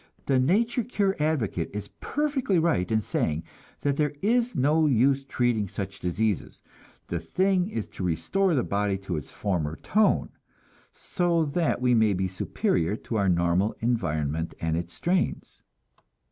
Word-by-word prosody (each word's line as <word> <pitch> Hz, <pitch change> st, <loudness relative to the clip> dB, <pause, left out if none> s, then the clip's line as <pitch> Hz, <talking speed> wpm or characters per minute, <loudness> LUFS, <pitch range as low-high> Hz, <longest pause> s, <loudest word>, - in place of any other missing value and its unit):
The 135 Hz, -2 st, +3 dB
nature 225 Hz, -, +2 dB
cure 205 Hz, -4 st, 0 dB
advocate 135 Hz, -, 0 dB
is 105 Hz, -, -5 dB
perfectly 280 Hz, -9 st, 0 dB
right 160 Hz, -, +1 dB
in 110 Hz, 0 st, +2 dB
saying 80 Hz, -4 st, -1 dB, 0.4 s
that 140 Hz, -1 st, 0 dB
there 150 Hz, -1 st, 0 dB
is 240 Hz, +3 st, +2 dB
no 150 Hz, +3 st, +3 dB
use 135 Hz, +1 st, +3 dB
treating 120 Hz, -6 st, 0 dB
such 95 Hz, +1 st, -6 dB
diseases; 100 Hz, +3 st, -2 dB, 0.4 s
the 85 Hz, -, -3 dB
thing 185 Hz, -, +1 dB
is 110 Hz, -, -4 dB
to -, -, -7 dB
restore 175 Hz, -, +1 dB
the 125 Hz, -, +2 dB
body 100 Hz, -1 st, 0 dB
to 95 Hz, -2 st, -4 dB
its 75 Hz, -, -5 dB
former 85 Hz, -7 st, -2 dB
tone, 215 Hz, -, +2 dB, 0.6 s
so 170 Hz, -2 st, 0 dB
that 150 Hz, -2 st, 0 dB
we 125 Hz, 0 st, +3 dB
may 110 Hz, -3 st, +4 dB
be 95 Hz, 0 st, 0 dB
superior 90 Hz, 0 st, -1 dB
to 115 Hz, 0 st, -4 dB
our 100 Hz, -2 st, +2 dB
normal 85 Hz, +4 st, +2 dB
environment 80 Hz, -9 st, -1 dB
and 80 Hz, -1 st, -1 dB
its 85 Hz, 0 st, -4 dB
strains. 180 Hz, +1 st, -1 dB
115 Hz, 150 wpm, -26 LUFS, -, 0.6 s, may